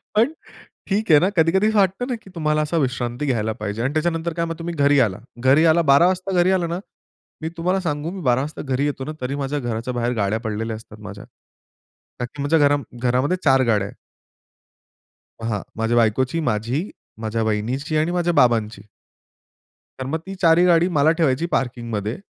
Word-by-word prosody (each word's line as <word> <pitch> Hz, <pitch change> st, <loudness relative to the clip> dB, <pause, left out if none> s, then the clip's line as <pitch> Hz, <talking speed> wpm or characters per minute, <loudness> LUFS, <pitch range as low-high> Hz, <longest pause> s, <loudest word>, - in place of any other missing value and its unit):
पण 230 Hz, +7 st, +3 dB, 0.6 s
ठीक 205 Hz, -1 st, 0 dB
आहे 150 Hz, -, +8 dB
ना, 180 Hz, -, +2 dB
कधी-कधी 175 Hz, +6 st, +3 dB
असं 220 Hz, -, +1 dB
वाटतं 195 Hz, +5 st, +2 dB
ना, 245 Hz, -, 0 dB
की 200 Hz, -, -15 dB
तुम्हाला 155 Hz, -2 st, +1 dB
असा 150 Hz, +2 st, -1 dB
विश्रांती 130 Hz, -2 st, -1 dB
घ्यायला 110 Hz, -5 st, 0 dB
पाहिजे. 105 Hz, +2 st, -3 dB
आणि 130 Hz, +4 st, -1 dB
त्याच्यानंतर 165 Hz, +1 st, -1 dB
काय 170 Hz, +1 st, -1 dB
मग 165 Hz, -, -4 dB
तुम्ही 170 Hz, +1 st, -4 dB
घरी 145 Hz, -1 st, +4 dB
आला. 95 Hz, -2 st, -4 dB, 0.3 s
घरी 145 Hz, +5 st, +5 dB
आला 170 Hz, +2 st, +3 dB
12:00 140 Hz, +6 st, +6 dB
वाजता 185 Hz, +1 st, -1 dB
घरी 180 Hz, +2 st, +3 dB
आला 170 Hz, -2 st, -2 dB
ना, -, -, -4 dB, 0.6 s
मी 160 Hz, -, -3 dB
तुम्हाला 180 Hz, +3 st, 0 dB
सांगू 150 Hz, +2 st, -2 dB
मी 190 Hz, 0 st, -7 dB
12:00 120 Hz, +1 st, +3 dB
वाजता 150 Hz, +3 st, -5 dB
घरी 140 Hz, +3 st, +1 dB
येतो 140 Hz, -2 st, -3 dB
ना, 155 Hz, -, -4 dB
तरी 130 Hz, +2 st, -2 dB
माझ्या 145 Hz, +2 st, -2 dB
घराच्या 120 Hz, 0 st, -3 dB
बाहेर 120 Hz, 0 st, -1 dB
गाड्या 100 Hz, +3 st, 0 dB
पडलेल्या 110 Hz, +1 st, -3 dB
असतात 110 Hz, -1 st, -13 dB
माझ्या. 100 Hz, 0 st, -10 dB, 0.9 s
का 125 Hz, -, -1 dB
की 140 Hz, +4 st, -9 dB
म्हणजे 145 Hz, +3 st, +2 dB
घरा 145 Hz, 0 st, +4 dB, 0.3 s
घरामध्ये 130 Hz, +9 st, +1 dB
4 135 Hz, -2 st, +4 dB
गाड्या 100 Hz, -2 st, +1 dB
आहेत. -, -, -12 dB, 1.5 s
हां, 110 Hz, -3 st, -2 dB
माझ्या 115 Hz, +2 st, 0 dB
बायकोची 125 Hz, +7 st, +2 dB
माझी, 120 Hz, -, -1 dB, 0.3 s
माझ्या 110 Hz, +1 st, -2 dB
वहिनीची 115 Hz, +8 st, -1 dB
आणि 155 Hz, +2 st, +1 dB
माझ्या 175 Hz, -1 st, 0 dB
बाबांची. 115 Hz, -6 st, +2 dB, 1.1 s
तर 130 Hz, -, -4 dB
मग 155 Hz, +3 st, -2 dB
ती 195 Hz, -, -6 dB
4 165 Hz, -1 st, +5 dB
ही 175 Hz, -, +5 dB
गाडी 175 Hz, 0 st, +4 dB
मला 145 Hz, +2 st, +5 dB
ठेवायची 155 Hz, 0 st, +1 dB
पार्किंगमध्ये. 115 Hz, -3 st, -2 dB
140 Hz, 190 wpm, -21 LUFS, 115-165 Hz, 1.5 s, आहे